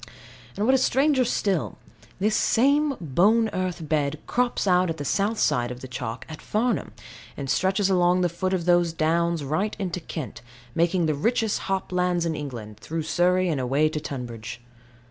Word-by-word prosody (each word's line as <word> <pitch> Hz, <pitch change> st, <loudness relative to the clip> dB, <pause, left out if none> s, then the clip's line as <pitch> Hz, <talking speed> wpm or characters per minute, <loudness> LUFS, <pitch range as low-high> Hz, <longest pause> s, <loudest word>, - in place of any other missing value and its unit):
And 205 Hz, -, 0 dB
what 260 Hz, -, +4 dB
is 265 Hz, -, +3 dB
stranger 270 Hz, 0 st, +3 dB
still, 200 Hz, -7 st, -1 dB, 0.4 s
this 210 Hz, +3 st, +1 dB
same 280 Hz, +6 st, +3 dB
bone 200 Hz, -, +3 dB
earth 180 Hz, -5 st, -3 dB
bed 150 Hz, -1 st, 0 dB
crops 245 Hz, -2 st, 0 dB
out 180 Hz, -1 st, +3 dB
on 165 Hz, -, -2 dB
the 145 Hz, -2 st, -6 dB
south 205 Hz, +8 st, 0 dB
side 125 Hz, -10 st, +1 dB
of 125 Hz, 0 st, -7 dB
the 130 Hz, -, -7 dB
chalk 125 Hz, -2 st, -5 dB
at 155 Hz, -1 st, -9 dB
Farnham, 230 Hz, +3 st, -1 dB, 0.5 s
and 140 Hz, -, -4 dB
stretches 190 Hz, +7 st, +2 dB
along 180 Hz, -1 st, +3 dB
the 180 Hz, -, +3 dB
foot 175 Hz, +2 st, -2 dB
of 180 Hz, -3 st, -1 dB
those 175 Hz, -2 st, +3 dB
downs, 165 Hz, 0 st, +1 dB
right 155 Hz, +10 st, -1 dB
into 185 Hz, -3 st, -3 dB
Kent, 150 Hz, -8 st, -7 dB, 0.3 s
making 170 Hz, +3 st, +2 dB
the 155 Hz, -, +1 dB
richest 220 Hz, -, 0 dB
hop 190 Hz, -1 st, -1 dB
lands 180 Hz, -1 st, +1 dB
in 165 Hz, -, 0 dB
England, 120 Hz, -8 st, -7 dB
through 165 Hz, 0 st, -4 dB
Surrey, 180 Hz, +3 st, +2 dB
and 150 Hz, -6 st, 0 dB
away 140 Hz, +5 st, +2 dB
to 155 Hz, -, -3 dB
Tunbridge. 120 Hz, -5 st, -6 dB
175 Hz, 180 wpm, -25 LUFS, 150-195 Hz, 0.5 s, what